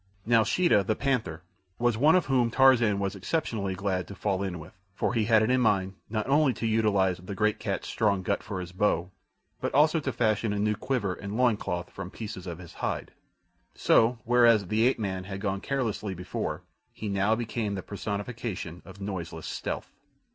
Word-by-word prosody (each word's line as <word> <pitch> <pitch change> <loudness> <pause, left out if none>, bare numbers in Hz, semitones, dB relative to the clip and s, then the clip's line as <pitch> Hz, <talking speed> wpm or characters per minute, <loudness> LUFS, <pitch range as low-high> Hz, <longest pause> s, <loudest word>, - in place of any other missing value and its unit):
Now 115 0 +5
Sheeta, 110 - +3
the 110 +3 0
panther, 110 - -1 0.3
was 120 -1 +2
one 150 +9 +5
whom 135 -9 +2
Tarzan 120 -5 +5
was 100 0 -2
exceptionally 100 - -2
glad 95 -2 -2
to 100 - -9
fall 95 0 -1
in 95 -3 -3
with, 80 0 -11 0.2
for - - 0
he 115 -3 +1
had 110 -1 +5
it 110 - +1
in 130 0 +3
mind 95 -5 +2 0.2
not 110 -1 -1
only 140 -1 +4
to - - -4
utilize 100 -5 +2
the 90 +2 -7
great 105 +1 +1
cat's - - -3
strong 100 -3 +1
gut 100 +2 0
for 100 -3 -5
his 90 -1 -6
bow, 90 -2 0 0.5
but - - -2
also 155 +3 +5
to 140 -3 -2
fashion 110 -2 +1
a - - -2
new 105 +1 +1
quiver 110 -4 -1
and 100 +3 -6
loin 125 -3 +4
cloth 90 -3 -4
from 90 - -7
pieces 105 -3 -7
of 85 -2 -5
his 90 -1 -12
hide. - - -3 0.6
So, 115 +2 +4
whereas 115 -5 +4
the 110 +3 +3
ape 130 - +2
man 95 -4 -3
had 95 0 -6
gone 100 -1 -2
carelessly 110 -7 -2
before, 90 +1 -4 0.3
he 110 - -6
now 100 +2 +2
became 110 -3 -2
the 95 - -5
personification 100 -4 -5
of 95 +3 -13
noiseless 85 -5 -5
stealth. - - -4
105 Hz, 190 wpm, -28 LUFS, 95-115 Hz, 0.6 s, Now